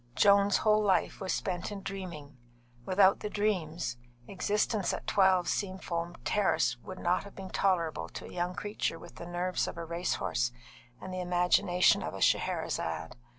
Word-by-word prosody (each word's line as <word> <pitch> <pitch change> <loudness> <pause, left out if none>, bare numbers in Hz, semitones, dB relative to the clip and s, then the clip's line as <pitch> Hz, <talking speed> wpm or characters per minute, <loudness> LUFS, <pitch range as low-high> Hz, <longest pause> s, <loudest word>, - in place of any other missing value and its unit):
Joan's 200 +6 +5
whole 215 0 +3
life 195 -2 +1
was 190 - -2
spent 180 +1 -2
in 200 -2 -6
dreaming; 170 -8 -7 0.5
without 190 +1 +5
the 210 - -4
dreams, 175 - -1 0.3
existence 205 +1 0
at - - -5
12, 190 -3 +3
Seafoam 175 -3 -2
Terrace 210 -2 +2
would 185 - -9
not 180 +1 +1
have 200 - -12
been 190 -1 -8
tolerable 175 -5 0
to - - -8
a - - -10
young 180 +1 -2
creature 205 -5 -2
with - - -13
the 170 - -7
nerves 175 +1 -1
of - - -6
a 170 - -4
racehorse 165 -8 -1 0.5
and 185 - -7
the 185 - -3
imagination 180 0 +3
of - - -4
a - - -6
Scheherazade. 80 +9 0
185 Hz, 160 wpm, -30 LUFS, 175-200 Hz, 0.5 s, Joan's